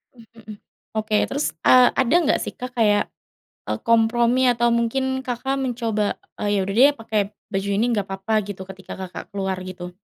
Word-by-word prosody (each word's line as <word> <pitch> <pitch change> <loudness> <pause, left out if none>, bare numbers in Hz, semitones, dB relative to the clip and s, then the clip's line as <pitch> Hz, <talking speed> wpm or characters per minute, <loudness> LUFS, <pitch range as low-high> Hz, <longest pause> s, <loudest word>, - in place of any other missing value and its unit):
Mhm 230 -1 -16 0.2
hmm, 215 -1 -8 0.4
oke 215 0 0
terus, 285 +2 -1 0.2
eee, 250 -1 +7
ada 260 +3 +2
enggak 295 - +2
sih, - - -6
Kak, 250 +1 -6
kayak 205 -2 +4 0.7
e - - 0
kompromi 230 +2 +3
atau 235 0 +1
mungkin 265 +3 0
Kakak 260 +2 -2
mencoba, 225 -4 -1 0.4
"Ya 205 - +2
udah 195 +1 -4
deh 280 +3 +7
pakai 220 -1 0 0.3
baju 195 +1 -1
ini 225 - +2
enggak 205 -3 -1
papa," 195 +3 -4
gitu, 195 -2 -7
ketika 190 0 -10
Kakak 185 -1 -7
keluar 190 -1 -2
gitu? 180 -1 -8
225 Hz, 175 wpm, -22 LUFS, 200-245 Hz, 0.7 s, eee